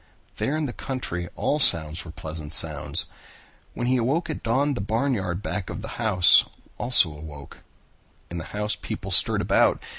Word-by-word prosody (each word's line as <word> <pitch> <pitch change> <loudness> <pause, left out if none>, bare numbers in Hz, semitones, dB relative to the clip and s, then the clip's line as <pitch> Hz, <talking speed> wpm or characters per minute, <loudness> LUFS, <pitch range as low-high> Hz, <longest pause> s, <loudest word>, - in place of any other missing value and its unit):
There 145 +3 -1
in 155 - -2
the 125 - -5
country 90 -10 -5
all 150 - -1
sounds 80 - +4
were 85 - -11
pleasant 80 -1 -7
sounds. 75 -4 0 0.7
When 120 - -3
he 130 +1 +2
awoke 135 +9 -1
at - - -6
dawn 135 +5 0
the 120 - -4
barnyard 105 -4 -2
back 100 -4 -4
of - - -7
the - - -6
house 95 -6 +5 0.4
also 120 -9 +5
awoke. 75 -2 -11 0.7
In 85 - -4
the 80 - -7
house 105 0 -2
people - - -7
stirred - - +6
about. - - +2
105 Hz, 170 wpm, -24 LUFS, 80-130 Hz, 0.7 s, stirred